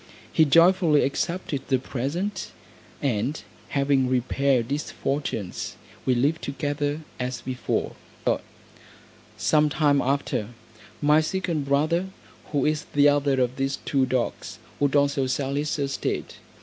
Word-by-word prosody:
He 160 - +5
joyfully 165 0 +5
accepted 165 +1 -2
the 130 - +3
present, 150 +11 -3 0.5
and 130 +2 0 0.3
having 140 -2 +2
repaired 130 0 +1
his 150 +2 -2
fortunes, 135 -9 -3 0.3
we 130 - +4
lived 145 +7 +1
together, 145 +1 -2 0.2
as 125 0 -3
before. 130 -1 -2 1.5
Some 150 +8 +3
time 145 -2 +3
after, 135 -5 0 0.6
my 150 +1 +5
second 165 -3 -1
brother, 155 +6 +1 0.4
who 145 -3 0
is 155 0 0
the 145 0 +6
other 145 -2 +2
of 125 0 0
these 135 0 0
two 135 -2 +2
dogs, 125 -2 -2 0.2
would 145 0 +2
also 140 -1 +2
sell 135 +1 -1
his 145 +2 -1
estate. 140 -1 -2
140 Hz, 125 wpm, -25 LUFS, 130-150 Hz, 1.5 s, the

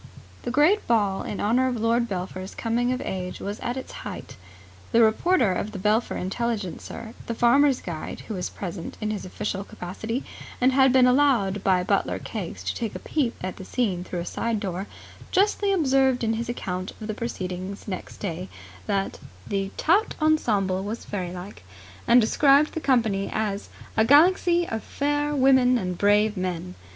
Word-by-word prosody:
The - - -4
great 300 - +3
ball 205 -4 +2
in 205 - -5
honour 245 +5 +2
of 245 -3 -2
Lord 230 +1 +1
Belpher's 185 0 -5
coming 240 +2 0
of 255 +1 -2
age 180 -1 -4
was 205 +2 -5
at 245 +2 -3
its 260 - -6
height. - - -8 0.6
The 230 - +6
reporter 225 - +3
of 205 +4 -3
the - - -5
Belpher 210 +4 +1
Intelligencer 220 +1 -4
and 230 - -3
Farmers' 270 +3 +4
Guide, 165 -3 -6
who 220 - -7
was 180 -3 -3
present 175 -3 -6
in 215 -1 -2
his 210 -3 -4
official 195 +1 -3
capacity, 220 +7 -5 0.4
and 255 +1 +4
had 265 0 +5
been 260 -1 +6
allowed 250 -7 +3
by 185 -2 +3
butler - - 0
Keggs - - -6
to - - -2
take 225 -4 -4
a - - -2
peep 270 -7 -1
at 185 0 -4
the - - -8
scene 190 -5 -1
through 180 -1 -4
a - - -5
side 230 +4 -2
door, 195 -1 -4 0.4
justly 405 +1 +2
observed 270 -8 +3
in 225 0 +1
his 235 +1 -3
account 185 -5 -4
of 220 - -6
the 215 - -3
proceedings 190 -3 -5
next 185 -3 -6
day 180 -1 -4 0.4
that 195 -1 -1 0.3
the 195 -1 -2
'tout 385 +7 +2
ensemble 210 - +2
was 215 +3 -5
fairylike', 185 0 -6 0.5
and 240 - +7
described 280 +6 +4
the - - -2
company 225 -9 +1
as 210 -2 -2 0.3
'a 220 - +4
galaxy 340 +6 +5
of 225 0 -3
fair 290 +1 -1
women 260 -2 +5
and 180 -5 -3
brave 210 +1 +3
men'. 180 - -3
220 Hz, 175 wpm, -25 LUFS, 190-260 Hz, 0.6 s, and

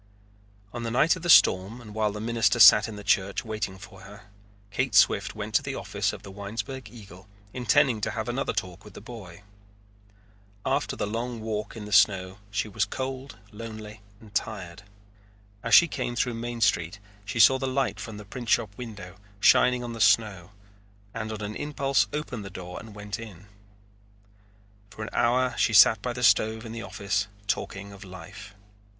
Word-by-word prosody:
On 120 - -5
the 115 - -3
night 135 +9 +3
of 180 - -9
the 175 - -4
storm 100 - +5
and 110 -3 -12
while 110 -1 0
the 105 - -7
minister 115 0 +1
sat 105 +1 +9
in 110 - -7
the 105 - -9
church 100 +1 +1
waiting 110 -4 -4
for 90 - -13
her, 105 0 -14 0.4
Kate 125 +1 -1
Swift 100 - +4
went 105 0 -6
to - - +4
the 140 -1 -5
office 100 +1 -2
of - - -10
the 100 - -10
Winesburg 105 +5 -6
Eagle, 100 -4 -14 0.3
intending 125 -1 +2
to - - -1
have - - -4
another - - -1
talk 90 +1 -5
with 105 - -14
the - - -8
boy. 105 -5 -11 1.2
After - - 0
the - - -2
long 115 +3 -4
walk 110 0 -4
in 105 - -7
the 105 - -9
snow 95 -1 +3
she 100 +1 -2
was 105 +1 -1
cold, 130 +2 -6
lonely, 110 -1 -9 0.2
and 105 -2 -16
tired. 95 -4 -4 0.8
As 115 - +4
she 175 - +8
came 120 -5 -4
through 120 0 0
Main 120 +1 -5
Street 90 -1 +1 0.3
she 100 +3 -5
saw 130 +4 +7
the 135 - -2
light 135 +1 -1
from 110 -2 -7
the 105 - -10
printshop 110 -2 -1
window 105 -6 -9 0.2
shining 125 +3 +4
on 120 -1 -5
the 115 - -6
snow 100 -7 +2 0.6
and 110 -1 -4
on 110 -1 -6
an 105 +1 -5
impulse 140 -2 0
opened 145 -7 -4
the 100 - -8
door 90 -1 -8
and 110 -1 -12
went 105 0 -6
in. 100 -5 -11 1.4
For 110 - -8
an 110 - -7
hour 125 +1 +2
she 110 - +2
sat 105 0 +7
by 125 +2 -3
the 125 0 -5
stove 110 +2 +3
in 110 - -7
the 115 0 -6
office 100 -1 -2 0.2
talking 100 0 -3
of 100 0 -12
life. 100 +3 -11
110 Hz, 185 wpm, -26 LUFS, 100-120 Hz, 1.4 s, sat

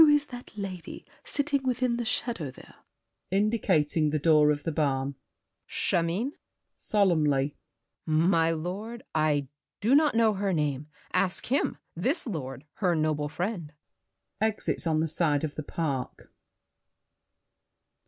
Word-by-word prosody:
Who 320 - +10
is 295 0 +4
that 245 0 -8
lady 190 -4 -6 0.2
Sitting 285 -1 0
within 250 -2 0
the 240 - -2
shadow 225 - -1
there? - - -14 0.6
[Indicating 185 -7 +2
the 155 - +1
door 150 -1 +5
of 145 -1 0
the 165 - -1
barn. 140 -3 0 0.5
GRACIEUX. - - -41 0.3
Chimène? 185 +11 -1 0.4
[Solemnly.] 150 - +2 0.5
My 165 +1 +3
lord, 195 +9 -4
I 150 -3 +2 0.3
do 225 +6 +2
not 295 -2 +5
know 225 -1 +4
her 195 -1 0
name. 150 -3 -1 0.3
Ask 195 +4 0
him, 275 - +1 0.2
This 255 - 0
lord, 135 - -5
her 180 -4 +2
noble 155 -2 0
friend. 175 -3 -3 0.7
[Exits 215 -5 0
on 155 -1 +2
the 165 - +1
side 155 -2 +1
of 150 -2 -2
the - - -4
park. 145 -4 -4
170 Hz, 135 wpm, -28 LUFS, 150-220 Hz, 0.7 s, Who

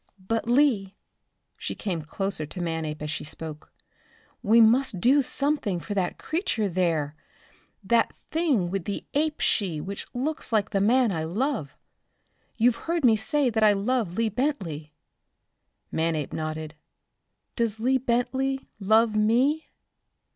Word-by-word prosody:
"But, 225 +1 -1
Lee," 240 -8 +3 0.6
she - - -4
came 180 -6 -3
closer 155 0 -4
to 180 - -8
Manape 160 -3 -3
as 150 - -3
she - - -4
spoke 155 0 -8 0.7
"we 225 +3 +5
must 230 -2 +4
do 265 +9 +5
something 275 - -1
for 205 - -5
that 190 -3 -1
creature 315 - -1
there 165 -5 0 0.7
that 230 +4 +2 0.2
thing 280 - +1
with 195 -3 -2
the 200 - -4
ape 300 +1 0
she 180 -8 0
which 195 +5 -6
looks 290 +4 -2
like 215 -2 +1
the 195 -2 +1
man 240 +2 +4
I 160 -3 -2
love. 210 - -2 0.8
You've 235 0 +3
heard 335 -4 +1
me 225 -2 +6
say 250 +5 +1
that 220 0 +1
I 210 -1 +6
love 205 -2 -1
Lee 230 -1 +2
Bentley?" 185 - -3 1.0
Manape 160 -3 -1
nodded. 155 -1 -4 0.8
"Does 225 -3 0
Lee 260 +3 +2
Bentley 260 +2 -1
love 220 +2 +3
me?" 250 +9 +2
215 Hz, 140 wpm, -26 LUFS, 175-255 Hz, 1.0 s, me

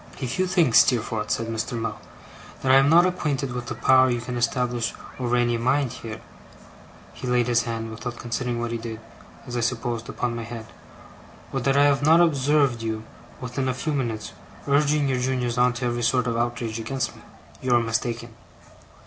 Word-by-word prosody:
'If 130 +6 -3
you 185 - +2
think, 175 -9 +2
Steerforth,' 110 -4 +3
said 115 - 0
Mr. 115 +1 -3
Mell, 115 -2 -4 0.6
'that 130 - +3
I 135 - +8
am 135 +1 +5
not 170 +3 +7
acquainted 150 -7 -1
with 125 -1 -5
the 120 - -4
power 130 0 +5
you 120 -1 0
can 125 +1 -5
establish 120 -1 0 0.2
over 125 -1 0
any 120 -1 +2
mind 130 +2 +1
here' 110 -1 -8 0.9
he 130 - -7
laid 125 -1 +2
his 120 -2 +2
hand, 115 -1 -4
without 115 +2 -6
considering 120 0 -3
what 120 0 -2
he 115 - -2
did 115 -1 -6 0.5
(as 125 -2 -6
I - - 0
supposed), 120 0 -2
upon 120 -1 -2
my 115 - -4
head 115 -1 -7 0.9
'or - - 0
that 135 0 +1
I 140 - +6
have 140 -1 +3
not 160 +3 +6
observed 140 -6 +3
you, 110 -1 -3 0.4
within 125 +1 -2
a 130 - -1
few 155 +4 -2
minutes, 115 -6 -2 0.4
urging 145 +1 +3
your 130 -2 0
juniors 125 -1 -1
on 125 0 +5
to 125 +1 -4
every 120 0 -1
sort 125 +2 +2
of 115 -1 -1
outrage 115 -1 -2
against 130 +4 -3
me, - - -15 0.4
you 130 - -1
are - - +5
mistaken. 115 0 -2
120 Hz, 195 wpm, -24 LUFS, 115-135 Hz, 0.9 s, I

